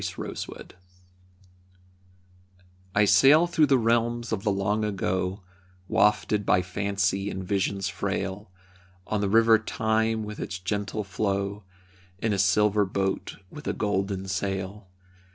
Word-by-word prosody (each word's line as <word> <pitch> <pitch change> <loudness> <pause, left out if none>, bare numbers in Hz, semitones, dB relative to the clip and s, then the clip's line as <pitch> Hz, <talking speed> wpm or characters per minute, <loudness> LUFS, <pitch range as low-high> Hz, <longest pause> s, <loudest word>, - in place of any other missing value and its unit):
Meditation - - -7 2.3
I 100 0 +5
sail 135 - +6
through 170 -3 +2
the 135 -1 +4
realms 120 0 0
of 110 -3 -1
the 105 - +1
long 100 +2 0
ago, 95 -1 -2 0.4
Wafted 105 +1 +2
by 90 -2 +2
fancy 100 +1 -1
and 95 -1 -5
visions 95 0 -1
frail, 95 +2 -3 0.6
On 105 -1 -1
the 100 - 0
river 115 +1 +5
Time 110 0 0
with 105 0 -7
its 100 - -4
gentle 100 +3 -3
flow, 100 0 -2 0.5
In 110 +2 -1
a 100 - -1
silver 105 +2 +3
boat 95 0 -2
with 150 -1 -9
a - - 0
golden 100 -2 -2
sail. 95 +1 -3
100 Hz, 125 wpm, -26 LUFS, 95-110 Hz, 2.3 s, sail